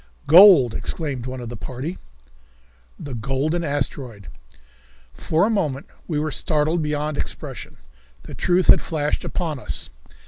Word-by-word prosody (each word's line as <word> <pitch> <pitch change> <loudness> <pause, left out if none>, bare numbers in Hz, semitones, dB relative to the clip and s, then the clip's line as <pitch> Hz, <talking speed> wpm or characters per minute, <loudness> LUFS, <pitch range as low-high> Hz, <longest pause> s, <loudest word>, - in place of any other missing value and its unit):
"Gold," 165 - +8
exclaimed 135 -7 -3
one 130 0 -6
of 120 - -7
the 120 - -7
party. 130 - -6 1.0
The 140 - -7
Golden 135 +8 -2
Asteroid! 130 - -3 0.8
For 165 +4 0
a - - 0
moment 150 -10 -1 0.2
we 155 - -2
were 155 +1 -1
startled 155 +2 +1
beyond 150 0 -2
expression. - - -6 0.5
The - - -10
truth 180 +1 +1
had - - +6
flashed 150 -2 -2
upon 160 -6 -3
us. 70 - -5
150 Hz, 135 wpm, -22 LUFS, 130-160 Hz, 1.0 s, Gold